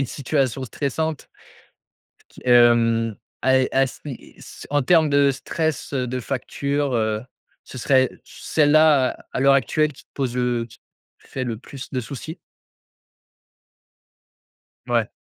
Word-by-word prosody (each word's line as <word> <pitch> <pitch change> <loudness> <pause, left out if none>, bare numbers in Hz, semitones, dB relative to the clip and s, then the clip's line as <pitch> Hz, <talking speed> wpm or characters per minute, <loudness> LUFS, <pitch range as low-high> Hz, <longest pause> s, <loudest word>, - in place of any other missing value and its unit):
une 135 - 0
situation 135 -1 -1
stressante 155 +4 -3 1.0
qui - - -17
et 125 - -2
hem, 115 -2 +4 0.3
ah 130 0 +4
et 130 - +1
as 135 0 0
mais 135 -5 -6 0.5
en 145 0 +2
termes 160 +2 +4
de 140 -1 +4
stress, 160 +2 -3
heu, 125 -2 -1
de 130 +1 -3
facture, 140 +2 -2
heu, 110 -2 0 0.4
ce 130 - -11
serait 130 +1 +3 0.2
celle-là 150 -3 +3 0.2
à - - -3
l'heure 135 +1 +5
actuelle 150 +2 +1
qui - - -17
te - - -57
pose 130 -3 -2
le 120 -2 0
qui - - -16
te - - -30
fait 130 - -4
le 115 -3 -3
plus 135 +2 -10
de 130 - -1
soucis? 150 +7 -7 2.5
Ouais. - - +1
135 Hz, 140 wpm, -22 LUFS, 125-145 Hz, 2.5 s, l'heure